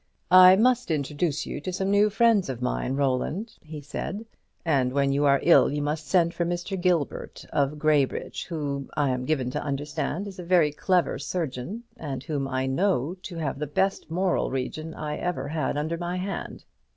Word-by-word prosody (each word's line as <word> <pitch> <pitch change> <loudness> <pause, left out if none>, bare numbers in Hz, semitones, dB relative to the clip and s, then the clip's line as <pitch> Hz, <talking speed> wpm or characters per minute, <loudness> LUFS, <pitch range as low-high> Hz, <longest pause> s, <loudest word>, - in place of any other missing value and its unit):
"I 185 0 +9
must 245 +2 +2
introduce 150 0 -1
you 145 - -5
to 185 - -4
some 190 +2 -1
new 205 +1 +4
friends 220 - +3
of 130 -3 -4
mine, 125 +1 -1
Roland," 145 - -1
he 155 -1 -9
said; 195 +9 -5 0.4
"and 135 -6 +2
when 140 0 +2
you 140 +1 +2
are 140 -1 +5
ill 170 - +6
you 145 0 -2
must 150 0 -3
send 170 0 +3
for 175 - -1
Mr. 175 +3 -2
Gilbert 175 -5 -1
of 145 0 +1
Graybridge, 150 -3 0
who, 140 -5 -3
I 145 -3 +2
am 125 0 -2
given 130 -5 0
to - - -2
understand, 150 +6 -3
is 195 -1 -9
a - - -5
very 170 -4 +3
clever 180 +4 +1
surgeon, 170 - -4
and 140 - -5
whom 145 -3 -2
I 130 0 -1
know 160 +1 +1
to 180 - -8
have 145 -4 -3
the 150 - -2
best 190 +7 0
moral 180 +2 0
region 155 +5 -4
I 150 -1 -4
ever 145 -6 -3
had 155 -1 -1
under 160 +3 -2
my 175 +1 -3
hand. 195 +2 -5
155 Hz, 190 wpm, -26 LUFS, 140-180 Hz, 0.4 s, I